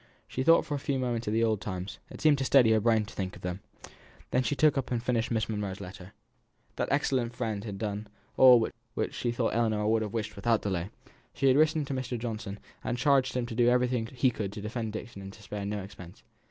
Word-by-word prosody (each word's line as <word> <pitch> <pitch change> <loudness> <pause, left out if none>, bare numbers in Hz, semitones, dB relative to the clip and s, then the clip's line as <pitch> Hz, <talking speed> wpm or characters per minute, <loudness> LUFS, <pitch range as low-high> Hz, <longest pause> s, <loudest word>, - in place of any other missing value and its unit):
She 130 - -3
thought 165 +5 +5
for 150 - -4
a 145 - -1
few 140 0 -1
moments 120 -3 -2
of 105 - 0
the 115 +1 +2
old 110 -3 +1
times; 95 -1 -5
it - - -10
seemed 150 -3 +4
to - - 0
steady 130 -4 +5
her 110 - +4
brain 110 -1 +2
to 105 - -12
think 95 0 -4
of - - -14
them. 90 +1 -3 0.7
Then 125 - +3
she 130 +3 -1
took 155 +1 +4
up 135 -2 -2
and 120 -2 -1
finished 120 -2 0
Miss 110 -4 0
Monro's 105 -3 -3
letter. 95 0 -10 0.6
That - - 0
excellent 130 -4 +1
friend 110 -4 -3
had 105 -3 -6
done 105 0 -4 0.3
all 125 -4 +7 0.3
which - - -2
she 120 - -1
thought 120 -1 -1
Ellinor 110 -2 +1
would 110 0 +3
have 105 -2 -3
wished 110 -2 -3
without 115 +2 +1
delay. 95 -2 -2 0.5
She 140 - -1
had 130 - +5
written 155 0 +3
to 140 - -4
Mr. 130 -2 -3
Johnson, 110 -3 -5 0.3
and 120 - -2
charged 135 0 +3
him 125 - 0
to 120 - -6
do 120 +1 +4
everything 125 -2 +1
he 125 +1 +1
could 105 -4 -4
to 105 - -7
defend 110 +1 -4
Dixon 110 -2 -7
and 95 0 -8
to 105 - -15
spare 100 -1 -5
no 105 -1 -3
expense. 95 -3 -12
115 Hz, 240 wpm, -29 LUFS, 105-125 Hz, 0.7 s, all